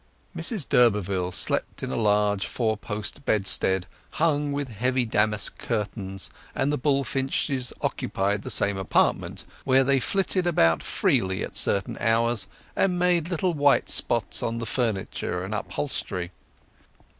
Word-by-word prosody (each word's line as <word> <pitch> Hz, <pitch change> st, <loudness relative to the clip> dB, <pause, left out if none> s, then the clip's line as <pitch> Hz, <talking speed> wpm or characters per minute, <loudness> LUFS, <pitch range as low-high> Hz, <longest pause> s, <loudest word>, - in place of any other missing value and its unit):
Mrs 210 Hz, -, -1 dB
d'Urberville 100 Hz, -6 st, +2 dB
slept -, -, -1 dB
in -, -, -3 dB
a -, -, -2 dB
large 105 Hz, -2 st, +1 dB
four 110 Hz, -3 st, -1 dB
post 105 Hz, +6 st, -5 dB
bedstead 95 Hz, -4 st, +1 dB, 0.3 s
hung 150 Hz, -2 st, +1 dB
with 140 Hz, -1 st, -3 dB
heavy 125 Hz, +3 st, 0 dB
damask 105 Hz, -2 st, 0 dB
curtains, 100 Hz, -3 st, -4 dB, 0.2 s
and 140 Hz, -, +1 dB
the -, -, 0 dB
bullfinches 135 Hz, -1 st, 0 dB
occupied 100 Hz, +1 st, -1 dB
the -, -, -7 dB
same 100 Hz, -1 st, +3 dB
apartment, 95 Hz, -4 st, 0 dB, 0.2 s
where 135 Hz, 0 st, +4 dB
they 135 Hz, +1 st, +3 dB
flitted 185 Hz, +4 st, 0 dB
about 80 Hz, -, +3 dB
freely 95 Hz, 0 st, 0 dB
at -, -, -7 dB
certain 100 Hz, -1 st, 0 dB
hours, 115 Hz, 0 st, +1 dB, 0.3 s
and 185 Hz, -2 st, +1 dB
made 175 Hz, -2 st, +1 dB
little 180 Hz, 0 st, 0 dB
white 145 Hz, -2 st, +3 dB
spots 120 Hz, -2 st, +4 dB
on 115 Hz, 0 st, -2 dB
the 115 Hz, -, -4 dB
furniture 105 Hz, -6 st, -2 dB
and 100 Hz, -, -5 dB
upholstery. 100 Hz, -6 st, -3 dB
115 Hz, 135 wpm, -25 LUFS, 100-140 Hz, 0.3 s, where